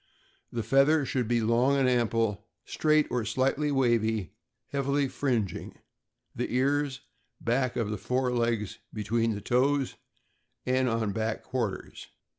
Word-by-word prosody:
The 115 -2 -2
feather 140 +4 +4
should 125 -3 -1
be 120 0 +2
long 120 +5 +3
and 135 -2 +3
ample, 115 -4 +1 0.2
straight 155 -1 +2
or 125 - +1
very 110 - -4
slightly 135 +5 +1
wavy, 115 - +1 0.4
heavily 140 0 0
fringing 120 -8 -2 0.6
the - - -3
ears, 135 +1 +1 0.4
back 125 +1 0
of 105 -4 -2
fore 125 0 0
legs, 115 -4 -1
between 115 +1 0
the 100 - -6
toes, 135 +4 +1 0.7
and 130 0 +2
on 115 -2 0
back 110 +2 -2
quarters. 110 -8 -4
120 Hz, 130 wpm, -28 LUFS, 110-135 Hz, 0.7 s, feather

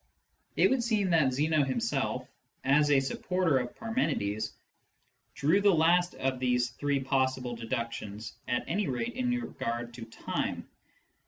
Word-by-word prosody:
It - - +4
would 265 -2 +2
seem 215 -5 +1
that 155 -6 +4
Zeno 150 +3 +2
himself, 135 - -1 0.4
as 145 +2 +4
a 140 -2 +5
supporter 165 +2 +1
of 120 -1 -5
Parmenides, 110 - -1 0.8
drew 160 +8 +3
the 200 -3 +5
last 175 +3 +3
of 130 -1 -1
these 125 -1 +1
three 140 +2 0
possible 130 -2 0
deductions, 115 -3 -4
at 120 - 0
any 200 +3 0
rate 185 - -2
in 250 0 -1
regard 120 - -3
to 120 -1 -8
time. 115 - -3
135 Hz, 140 wpm, -30 LUFS, 125-180 Hz, 0.8 s, a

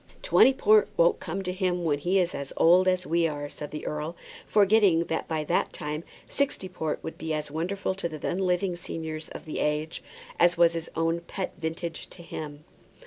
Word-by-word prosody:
"Twenty - - +6
port 215 -5 +4
won't 170 +1 +4
come 185 +3 -4
to 180 - -2
him 180 -2 0
when 145 -3 +1
he 180 +6 +1
is 180 -1 +1
as 140 -1 -5
old 180 +3 +6
as 185 0 +2
we 170 0 +2
are," 145 -2 -4
said 145 0 -7
the 150 - -6
earl, 150 +3 -3 0.3
forgetting 200 -5 +4
that 160 -1 -3
by 160 -1 -1
that - - 0
time 150 +2 -4 0.2
sixty 280 -9 -1
port 160 -4 -3
will 160 - -4
be 160 -1 -3
as 150 -1 -4
wonderful 185 +5 -2
to 190 -3 -3
the 155 - -6
then 175 +5 -2
living 180 -1 +1
seniors 160 -2 -6
of - - -9
the 155 - -4
age 150 +2 -1 0.4
as 175 0 +5
was 170 0 +5
his 165 -1 -4
own 165 +1 +1
pet 185 +2 -5
vintage 165 0 -4
to 170 - -13
him. 150 -3 -7
170 Hz, 200 wpm, -27 LUFS, 155-185 Hz, 0.4 s, Twenty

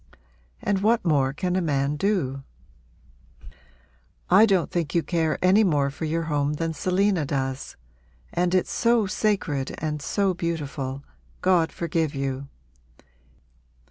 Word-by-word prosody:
and 200 -1 +1
what 220 +1 +2
more 140 -5 +2
can 180 +5 -2
a 185 - +1
man 145 -3 0
do?' 150 -7 -1 1.9
'I 205 +5 +7
don't 190 -5 +1
think 170 -3 -2
you 170 - +3
care 160 -3 0
any 195 +4 +5
more 145 -7 +2
for 155 +3 -5
your 165 +2 -1
home 145 -2 0
than 165 +2 -2
Selina 185 +2 +1
does. 135 -1 -3 0.6
And 180 +1 +1
it's 185 - +1
so 235 -2 +2
sacred 190 -9 -1
and 150 -1 -3
so 195 +5 0
beautiful, 145 -6 -4 0.4
God 175 -3 +3
forgive 165 -3 -2
you! 135 0 -3
165 Hz, 130 wpm, -25 LUFS, 145-185 Hz, 1.9 s, I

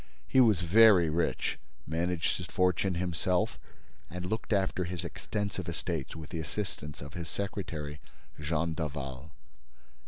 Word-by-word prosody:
He 130 - +4
was 110 -8 +6
very 90 -2 +7
rich, 85 +2 0 0.3
managed 85 +1 0
his - - -6
fortune 90 0 +2
himself 90 +1 0 0.5
and 90 +1 -5
looked 110 +5 -3
after 95 -3 +2
his 90 0 -3
extensive 100 +1 -3
estates 80 -3 -3
with 80 -1 -8
the 85 - -3
assistance 75 -3 -4
of 70 +1 -9
his 85 -2 -5
secretary, 80 -7 -4 0.4
Jean 80 +2 0
Daval. 70 -3 -4
85 Hz, 130 wpm, -31 LUFS, 80-95 Hz, 0.5 s, very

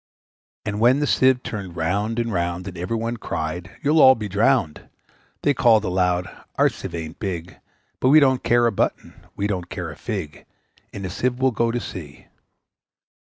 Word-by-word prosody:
And 105 0 -3
when 125 +5 +4
the 145 - +1
Sieve 130 -2 +3
turned 95 -5 -6
round 100 +7 -1
and 115 -2 -1
round, 85 +1 -2
And 95 - -7
every 90 +6 -3
one 115 +1 -3
cried, 85 -1 -4
`You'll 150 +3 +3
all 130 0 +8
be 110 -2 -5
drowned!' 100 - +1 0.5
They 145 - +3
called 115 -5 +4
aloud, 90 -1 +1 0.3
`Our - - +4
Sieve - - -7
ain't 80 0 -7
big, 90 -3 -5 0.4
But 130 - +2
we 155 +3 +8
don't 130 -3 +3
care 120 0 +3
a 115 - +3
button! 100 - -2 0.2
we 100 - -2
don't 95 -4 -3
care 85 -3 -5
a - - -10
fig! 80 -6 -6 0.4
In 100 - -6
a - - -3
Sieve 125 +6 -1
we'll 130 0 +2
go 115 0 0
to 120 +1 -1
sea!' 80 -10 -9
105 Hz, 185 wpm, -22 LUFS, 90-120 Hz, 0.5 s, all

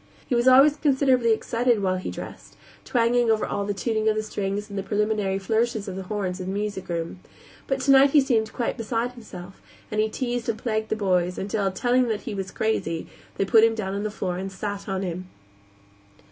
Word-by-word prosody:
He - - -3
was 240 +1 +2
always 275 +3 +7
considerably 265 -5 +3
excited 230 +1 +1
while 185 -1 +1
he 185 - -4
dressed, - - -9 0.3
twanging 240 0 +2
all - - +6
over 215 - -1
to 200 0 -2
the - - -9
tuning 220 -2 +1
of 215 - +1
the 215 - -1
strings 205 -1 -3
and 200 - -9
the 195 - -1
preliminary 205 -1 0
flourishes 220 +2 0
of 190 - -5
the 190 - -4
horns 190 -1 -3
in 185 - -5
the 190 - -2
music 205 -3 -4
room; 170 +1 -3 0.5
but 270 -1 -1
tonight 275 +1 +6
he 295 - +5
seemed 225 -5 +1
quite 240 - -2
beside 230 +1 -1
himself, 195 -6 -11 0.3
and 215 0 +1
he 220 - +1
teased 240 0 -3
and 220 - -1
plagued 220 -2 -2
the - - 0
boys 180 -4 +1
until, 195 0 -1
telling 245 +6 +2
him - - -3
that 215 -2 -1
he - - -5
was 195 -1 -4
crazy, 180 -7 -1 0.3
they 195 - +1
put 220 +3 +5
him 225 0 +4
down 195 -3 -3
on 200 - -2
the 215 - -2
floor 185 -3 -3
and 195 +1 -5
sat 200 +1 -5
on 190 0 -2
him. 180 0 -5
215 Hz, 220 wpm, -25 LUFS, 195-235 Hz, 0.5 s, always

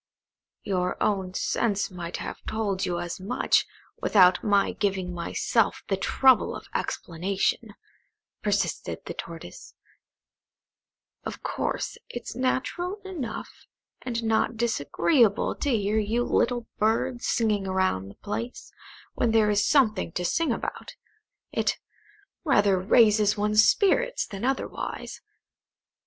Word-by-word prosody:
"Your 180 -3 -1
own 190 -3 0
sense 205 -4 0
might 175 -1 -5
have - - -6
told 205 -4 -1
you 175 -1 -1
as 175 +1 -5
much, 200 +7 +1 0.3
without 185 -3 +5
my 200 -2 +3
giving 190 -3 -2
myself 195 +5 0
the 195 - +2
trouble 260 +6 +3
of - - -9
explanation," 185 +3 -2 0.7
persisted - - -1
the - - -5
Tortoise. - - -9 1.5
"Of - - -7
course, - - -3
it's 240 - -7
natural 310 - -1
enough, 295 - -6 0.3
and 235 -2 -3
not 225 +1 +1
disagreeable, 230 - +2
to 290 - -1
hear 215 -3 +1
you 220 +3 0
little 240 -1 +1
birds 230 +3 0
singing 210 -4 +1
round 185 - 0
the 100 - -13
place, 230 +4 -6 0.4
when 235 - +1
there 220 -2 +4
is 205 0 +2
something 215 - +2
to 180 - -2
sing 320 - +1
about. 230 - -5 0.6
It - - 0 0.7
rather 205 - +3
raises 210 +1 +4
one's 210 +1 +4
spirits - - +2
than 195 0 -8
otherwise. 265 +1 -3
210 Hz, 115 wpm, -26 LUFS, 190-240 Hz, 1.5 s, without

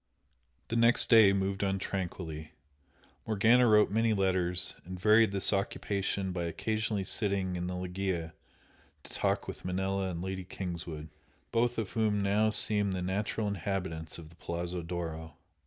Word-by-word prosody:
The 115 - -2
next 115 +2 +4
day 110 -4 +8
moved 100 0 -1
on 95 -1 0
tranquilly. 85 -5 -5 0.7
Morgana 115 +3 +4
wrote 105 -2 +5
many 115 +1 +2
letters 90 -2 +1
and 90 +1 -8
varied 110 +2 +5
this 100 +1 +2
occupation 100 -1 -1
by 90 -1 -3
occasionally 110 +3 -2
sitting 95 -2 -1
in 90 0 -3
the 90 - -4
loggia 90 -2 -3 0.7
to - - -13
talk - - -1
with - - -7
Manella 95 +1 -1
and 85 -2 -5
Lady 95 0 -4
Kingswood, 85 -4 -6 0.4
both 120 +1 +1
of 110 -4 -3
whom 105 -2 +1
now 105 +2 +2
seemed 105 -2 +3
the 90 -1 -3
natural 105 +3 -2
inhabitants 95 -4 -3
of 80 -2 -11
the 85 - -18
Palazzo 85 +1 -4
d'Oro. 80 -2 -5
95 Hz, 150 wpm, -30 LUFS, 90-105 Hz, 0.7 s, day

